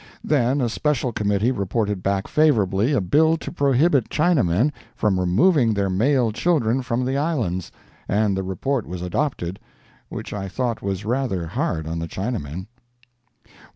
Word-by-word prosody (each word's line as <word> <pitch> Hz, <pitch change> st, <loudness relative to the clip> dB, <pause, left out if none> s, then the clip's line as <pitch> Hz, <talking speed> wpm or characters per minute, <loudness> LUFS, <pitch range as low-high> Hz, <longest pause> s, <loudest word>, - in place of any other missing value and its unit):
Then 135 Hz, -1 st, +2 dB
a 120 Hz, -, +1 dB
special 130 Hz, 0 st, 0 dB
Committee 105 Hz, +2 st, +1 dB
reported 100 Hz, -2 st, -1 dB
back 100 Hz, +1 st, -1 dB
favorably 110 Hz, -7 st, +2 dB
a 140 Hz, -, +3 dB
bill 155 Hz, -, +3 dB
to -, -, -7 dB
prohibit 140 Hz, -3 st, +2 dB
Chinamen 145 Hz, -, +2 dB, 0.2 s
from 95 Hz, -3 st, +1 dB
removing 115 Hz, -, +3 dB
their 100 Hz, -1 st, 0 dB
male 120 Hz, +4 st, +2 dB
children 130 Hz, -2 st, +1 dB
from 125 Hz, 0 st, -1 dB
the 135 Hz, +2 st, 0 dB
islands, 120 Hz, -, -1 dB, 0.4 s
and 105 Hz, 0 st, +1 dB
the 95 Hz, -, -1 dB
report 110 Hz, +7 st, -2 dB
was 90 Hz, 0 st, -5 dB
adopted—which 90 Hz, -, -5 dB
I 100 Hz, -1 st, -4 dB
thought 120 Hz, +3 st, -2 dB
was 100 Hz, +1 st, -3 dB
rather 115 Hz, -7 st, -1 dB
hard 80 Hz, -1 st, -2 dB
on 85 Hz, +1 st, -3 dB
the 85 Hz, -, -4 dB
Chinamen. 95 Hz, -, -4 dB
110 Hz, 145 wpm, -22 LUFS, 95-135 Hz, 0.4 s, a